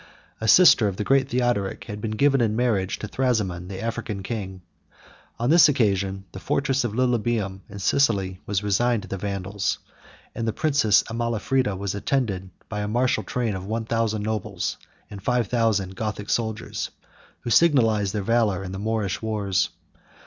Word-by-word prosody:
A 110 - -3
sister 120 - +7
of 95 -2 -3
the - - -1
great 135 +3 +2
Theodoric 120 -6 0
had 105 0 -7
been 110 - -2
given 140 0 +3
in 110 -2 +1
marriage 110 -6 0
to 105 - -6
Thrasimond, 105 -8 -1
the 95 -1 -6
African 110 -3 -4
king:49 95 -4 -5 0.8
on 120 +2 0
this 165 -2 +7
occasion, 100 -6 0
the 95 - -8
fortress 135 +4 0
of 120 -4 -2
Lilybæum50 115 -5 0
in - - -9
Sicily 95 -4 +1
was 100 -1 -1
resigned 110 +2 +1
to - - -9
the 95 +1 -5
Vandals; 100 0 -2 0.6
and 115 - -3
the 110 - 0
princess 135 -10 +3
Amalafrida 115 -1 -1
was 100 0 -3
attended 100 -4 -1 0.2
by 105 - -4
a 105 - -2
martial 120 +4 +1
train 120 -4 -2
of 95 0 -6
one 110 +1 -2
thousand 110 -2 0
nobles, 110 -1 -3 0.3
and 100 -1 -8
five 125 +2 +1
thousand 105 -6 +1
Gothic 105 0 -4
soldiers, 110 -2 -2 0.5
who 120 - -4
signalized 115 - +4
their 105 - -1
valor 110 -4 +1
in 95 - -6
the 95 - -5
Moorish 105 -2 -1
wars. 105 -4 0
110 Hz, 170 wpm, -24 LUFS, 100-120 Hz, 0.8 s, sister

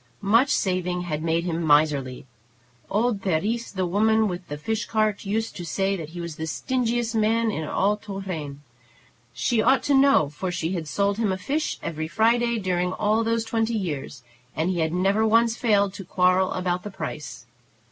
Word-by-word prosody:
Much 230 +7 +4
saving 180 -6 0
had 155 -4 -3
made 165 +1 0
him 170 -1 -2
miserly. 145 -5 +2 0.6
Old 215 0 0
Therese, 205 +6 -1
the 190 -2 -1
woman 220 +4 +2
with 180 -1 -5
the 145 - -5
fish 220 +9 -2
cart, 215 -2 0
used 220 +3 -2
to 175 - -6
say 195 +4 0
that 160 -5 -6
he 175 +2 -9
was 170 -3 -6
the 160 - -4
stingiest 240 +5 -1
man 225 +1 +2
in 160 -6 -3
all 200 +6 +1
Tourraine. 185 -9 -6 0.7
She 215 - 0
ought 265 +4 +3
to 285 - +1
know, 270 - +5
for 180 +6 -4
she 170 -1 -2
had 165 -4 -4
sold 200 +5 0
him 215 -4 +1
a 190 - -1
fish 290 +10 -2
every 160 -1 -3
Friday 235 +5 +2
during 180 -2 -1
all 215 +3 +1
those 230 0 0
twenty 225 0 0
years, 145 - -5 0.3
and 160 +5 0
he 175 - -2
had 160 -1 +1
never 195 +5 +2
once 230 +1 +3
failed 205 -5 +2
to 195 - -8
quarrel 185 +1 +2
about 180 -1 -1
the 210 - -7
price. 150 - -7
195 Hz, 185 wpm, -24 LUFS, 165-220 Hz, 0.7 s, know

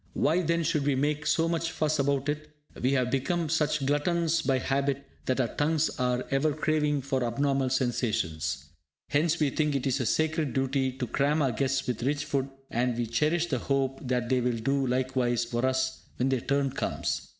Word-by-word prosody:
Why, 165 +5 +2
then, 170 0 +1
should 150 -2 0
we 140 - +3
make 150 +2 0
so 165 0 +3
much 165 0 -1
fuss 155 -1 0
about 140 0 +1
it? 150 +1 -3 0.3
We 130 +2 +2
have 125 -2 +1
become 155 +5 0
such 150 -3 +1
gluttons 165 +3 +1
by 135 -2 +1
habit 140 +1 -1 0.2
that 130 0 +1
our 120 -3 0
tongues 155 +1 +1
are 125 0 0
ever 140 +2 +2
craving 150 -2 0
for 135 -2 0
abnormal 135 +2 +1
sensations. 115 - -1 0.4
Hence 155 +3 +2
we 150 -3 +2
think 150 0 0
it 135 -1 -1
a 130 -1 0
sacred 160 -4 0
duty 135 0 +1
to 130 -1 -3
cram 145 +5 +1
our 135 - +2
guests 135 +3 0
with 125 -3 -2
rich 145 +4 0
food, 140 -2 -1 0.2
and 120 0 0
we 120 - 0
cherish 155 +9 +1
the 135 -7 -1
hope 135 0 0
that 125 -1 0
they 130 0 +2
will 120 -1 0
do 135 +4 0
likewise 125 -2 +1
for 120 +2 0
us, 130 0 -1
when 130 +2 0
their 130 -3 +1
turn 140 -1 0
comes! - - -2
135 Hz, 195 wpm, -28 LUFS, 130-150 Hz, 0.4 s, we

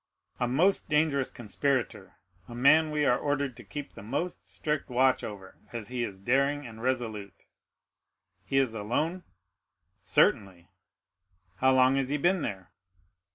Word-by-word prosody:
"A 125 - +1
most 170 +11 +2
dangerous 150 -3 +2
conspirator, 125 +3 -2 0.3
a 120 - -9
man 155 +6 +5
we 150 -1 0
are 125 - +3
ordered 140 -3 -1
to 120 - -11
keep 140 +8 -7
the - - -12
most 140 - -4
strict 150 -3 -3
watch 130 +1 +2
over, 95 -3 -9
as 115 -3 -6
he 125 -1 -2
is 100 -4 -5
daring 140 +7 +1
and 115 -2 -10
resolute." 115 -6 -3 1.0
"He 95 +8 -1
is 130 -4 +2
alone?" 150 - -2 0.8
"Certainly." 90 -3 +1 0.9
"How 130 +3 +3
long 130 +1 +4
has 135 -1 0
he 145 - 0
been 175 +4 +2
there?" 95 -7 -5
130 Hz, 145 wpm, -28 LUFS, 115-145 Hz, 1.0 s, man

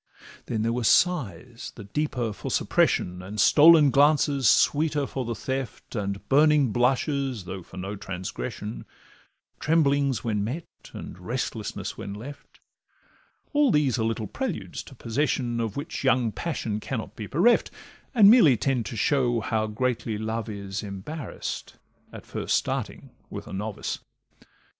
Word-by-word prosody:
Then 110 -2 -1
there 115 +1 +1
were 125 0 -2
sighs, 120 - +1
the 110 - -9
deeper 120 0 -2
for - - -6
suppression, 90 0 +1
And 100 +3 -7
stolen 150 +6 +7
glances, 140 -2 +3
sweeter 150 +5 +3
for 130 -2 -4
the 115 0 -3
theft, 130 0 -5
And 100 -2 -3
burning 145 -2 +4
blushes, 130 - 0
though 95 +1 -6
for 85 - -14
no 95 +3 -4
transgression, 100 +4 -6 0.7
Tremblings 140 -4 +2
when 105 -3 -1
met, 140 +11 -4 0.3
and 90 - -8
restlessness 110 +1 -4
when 100 - -6
left; 135 +7 -11 0.9
All 290 -1 +4
these 145 - +2
are - - +1
little 115 0 -1
preludes 135 - -4
to 135 - -13
possession, 120 0 -1
Of 115 -1 -3
which 140 - -5
young 125 -4 +3
passion 115 -8 -3
cannot 115 0 -5
be 105 - -6
bereft, 210 - +3 0.5
And 210 -4 +8
merely 200 - +7
tend 120 +1 0
to 115 - -6
show 120 -1 +2
how 110 0 -1
greatly 115 0 -2
love 110 +1 -3
is 100 -2 -5
Embarrass'd 105 +10 -6 0.4
at - - -10
first - - -1
starting - - -3 0.2
with - - -7
a - - -9
novice. 105 +2 -4
120 Hz, 145 wpm, -26 LUFS, 105-145 Hz, 0.9 s, And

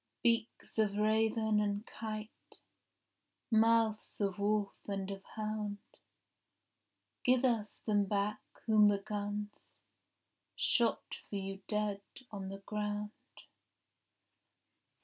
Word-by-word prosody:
Beaks 230 -1 +1
of 205 -2 +2
raven 220 0 +3
and 205 +1 0
kite, 215 -1 -7 0.9
Mouths 225 -1 +3
of 200 -2 0
wolf 205 0 +1
and 195 -1 -2
of 195 0 -6
hound, 215 -1 -2 1.5
Give 255 +1 +4
us 225 -4 0
them 205 -2 +3
back 205 +1 0 0.2
whom 215 -2 +6
the 205 -1 +4
guns 205 +1 -3 1.0
Shot 235 -2 +1
for - - -5
you 195 0 -4
dead 210 -2 0 0.3
on 195 -2 -5
the 195 - -5
ground. 210 0 -2
210 Hz, 100 wpm, -34 LUFS, 205-220 Hz, 1.5 s, whom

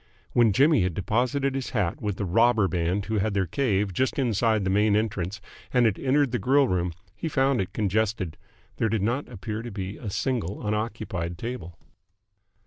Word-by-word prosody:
When 120 -3 +5
Jimmy 140 +3 +4
had 90 -2 0
deposited 125 +8 0
his 135 -1 -3
hat 90 -5 -1
with 105 -2 -2
the 100 - -2
robber 110 +2 +4
band 90 +3 -1
who 110 -1 0
had 105 +1 0
their 95 -1 +2
cave 100 - 0
just 130 +8 0
inside 115 -4 +2
the 95 - 0
main 105 +1 +3
entrance 100 -3 -1 0.3
and 125 -2 +4
had 110 -4 +1
entered 140 0 +2
the 120 - 0
grill 135 +6 +4
room, 90 -3 0 0.2
he 165 - -3
found 135 -5 +2
it 95 - -4
congested. 105 -4 -1 0.4
There 115 - +1
did 105 -2 0
not 120 +7 -1
appear 110 -1 -5
to 120 - -6
be 100 -1 -5
a 110 - -6
single 105 -3 -2
unoccupied 105 -5 -3
table. 115 -7 -6
110 Hz, 185 wpm, -26 LUFS, 95-120 Hz, 0.4 s, When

